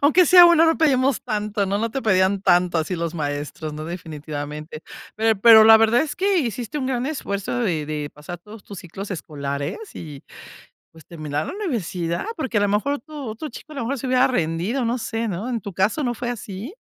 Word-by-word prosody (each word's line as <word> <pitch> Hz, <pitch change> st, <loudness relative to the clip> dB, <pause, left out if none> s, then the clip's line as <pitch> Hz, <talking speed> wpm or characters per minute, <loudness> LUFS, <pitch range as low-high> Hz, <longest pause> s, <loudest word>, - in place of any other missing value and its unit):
Aunque 325 Hz, +5 st, +5 dB
sea 355 Hz, +3 st, +9 dB
uno, 340 Hz, -1 st, +6 dB
no 325 Hz, -, +3 dB
pedimos 275 Hz, -4 st, +2 dB
tanto, 210 Hz, -3 st, -2 dB
¿no? 200 Hz, +1 st, -1 dB
No 230 Hz, +2 st, -1 dB
te 270 Hz, +3 st, -4 dB
pedían 190 Hz, -2 st, +2 dB
tanto 175 Hz, -2 st, +3 dB
así 160 Hz, +3 st, -2 dB
los 170 Hz, -1 st, -3 dB
maestros, 145 Hz, 0 st, -4 dB
¿no?, 155 Hz, +1 st, -6 dB
definitivamente. 150 Hz, -2 st, -7 dB, 0.3 s
Pero 220 Hz, -2 st, +1 dB
pero 220 Hz, -1 st, +9 dB
la 220 Hz, 0 st, +9 dB
verdad 225 Hz, +2 st, +3 dB
es 310 Hz, -, -5 dB
que 390 Hz, +1 st, +2 dB
hiciste 245 Hz, -, -3 dB
un 260 Hz, -, -2 dB
gran 255 Hz, -1 st, -1 dB
esfuerzo 205 Hz, -7 st, -3 dB
de 165 Hz, -9 st, -1 dB
de 150 Hz, -1 st, -4 dB
pasar 150 Hz, +4 st, -9 dB
todos 210 Hz, +4 st, -13 dB
tus 200 Hz, -, -9 dB
ciclos 195 Hz, +2 st, -8 dB
escolares 140 Hz, -3 st, -4 dB, 0.2 s
y, 150 Hz, -4 st, -9 dB, 0.7 s
pues, 160 Hz, -2 st, -16 dB
terminar 155 Hz, -2 st, -4 dB
la -, -, -5 dB
universidad, 190 Hz, -, -3 dB
porque 260 Hz, -8 st, -1 dB
a -, -, +1 dB
la 205 Hz, -, +2 dB
mejor 210 Hz, +8 st, 0 dB
otro 290 Hz, +1 st, -8 dB
otro 225 Hz, +8 st, -6 dB
chico 305 Hz, +5 st, -12 dB
a -, -, -10 dB
lo 275 Hz, -, -3 dB
mejor 265 Hz, +4 st, -2 dB
se 260 Hz, -, -5 dB
hubiera 255 Hz, 0 st, +4 dB
rendido, 185 Hz, +5 st, -1 dB
no 240 Hz, +2 st, 0 dB
sé, 225 Hz, 0 st, -3 dB
¿no? 200 Hz, +5 st, -4 dB
¿En 235 Hz, -3 st, -2 dB
tu 200 Hz, 0 st, -7 dB
caso 210 Hz, -, +1 dB
no 245 Hz, -3 st, -1 dB
fue 240 Hz, +1 st, -4 dB
así? 225 Hz, -, -7 dB
210 Hz, 215 wpm, -22 LUFS, 165-255 Hz, 0.7 s, sea